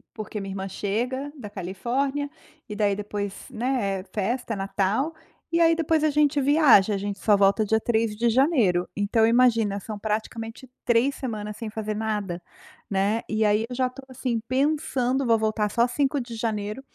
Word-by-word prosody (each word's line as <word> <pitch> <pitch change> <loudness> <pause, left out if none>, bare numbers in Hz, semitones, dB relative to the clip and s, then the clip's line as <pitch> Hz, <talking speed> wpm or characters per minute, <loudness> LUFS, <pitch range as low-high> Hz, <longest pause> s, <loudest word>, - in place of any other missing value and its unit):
porque 215 -1 -5
minha 195 -1 -5
irmã 195 0 -4
chega 245 +9 -2
da 210 -6 -8
Califórnia 245 +10 -2 0.4
e 210 - -5
daí 205 -1 +2
depois, 205 -1 -4 0.2
né, 225 -5 -1
é - - -13
festa 230 +3 -1
é - - -2
Natal, 200 +10 0 0.4
e 335 - +2
aí 330 0 +5
depois 320 -1 +1
a - - +4
gente 295 0 +2
viaja 270 -8 +5
a - - -1
gente 200 0 -4
só 210 -2 +4
volta 200 +2 +3
dia 220 +1 +1
3 225 -2 0
de 235 +1 +2
janeiro, 230 - +3
então 220 +2 +2
imagina 230 -4 +3
são 210 +1 -7
praticamente 225 +3 -4 0.2
3 245 +3 +3
semanas 210 -4 -5
sem 225 -1 -5
fazer 215 -1 -4
nada, 205 -5 -2 0.5
né, 200 +3 +1
e 220 0 +1
aí 210 +2 +2
eu 245 - -5
já 255 0 +1
tô 260 +2 -12
assim 255 -2 -2
pensando, 270 -1 +1
vou 230 -2 +4
voltar 215 -1 0
só 235 +3 +3
5 275 +2 0
de 240 -1 -8
janeiro, 215 +1 -3
225 Hz, 180 wpm, -25 LUFS, 205-260 Hz, 0.5 s, aí